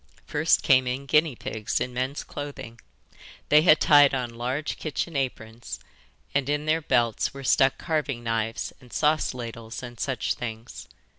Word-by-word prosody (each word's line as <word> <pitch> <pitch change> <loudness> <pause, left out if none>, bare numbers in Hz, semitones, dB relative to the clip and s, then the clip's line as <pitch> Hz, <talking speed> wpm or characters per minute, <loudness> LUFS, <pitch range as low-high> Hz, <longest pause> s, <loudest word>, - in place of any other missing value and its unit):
First 150 +2 +2
came 130 -1 +4
in 130 +3 -3
guinea 150 0 +3
pigs 110 -1 -3
in 125 - -3
men's 130 +3 -2
clothing. 135 -5 -8 0.7
They 150 +1 +7
had 155 -2 +6
tied 145 -2 +6
on 125 -2 -2
large 125 +6 -3
kitchen 160 +1 -4
aprons, 115 - -4 0.5
and 140 -1 0
in 150 +1 0
their 160 +1 +2
belts 120 -4 +1
were 135 - -8
stuck 135 +1 +3
carving 150 -7 -2
knives 115 -1 -2
and 125 -2 -17
sauce 155 -3 +1
ladles 115 -1 -7
and 120 -1 -9
such 135 -2 -1
things. 115 0 -7
130 Hz, 155 wpm, -26 LUFS, 120-145 Hz, 0.7 s, They